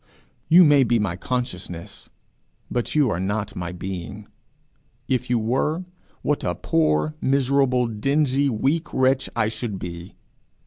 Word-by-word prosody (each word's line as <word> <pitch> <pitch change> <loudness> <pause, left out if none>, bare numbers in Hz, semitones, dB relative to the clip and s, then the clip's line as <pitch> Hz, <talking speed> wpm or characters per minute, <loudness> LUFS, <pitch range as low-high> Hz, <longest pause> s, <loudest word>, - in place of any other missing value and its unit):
You 175 +3 +8
may 145 -4 +6
be 120 -1 +2
my 100 -6 -1
consciousness, 90 -6 -5 0.6
but 120 +3 -2
you 145 -6 +3
are 85 - -1
not 105 +2 -2
my 85 -1 -4
being. 95 +3 -6 0.8
If 125 -1 -1
you 125 - +3
were, 135 +10 0 0.4
what - - 0
a - - -1
poor, 80 - +1
miserable, 135 -2 +2
dingy, 140 +5 +1
weak 140 +8 0
wretch 130 0 +2
I 115 -2 +2
should 110 -2 -4
be! 85 -1 -8
120 Hz, 135 wpm, -23 LUFS, 95-135 Hz, 0.8 s, You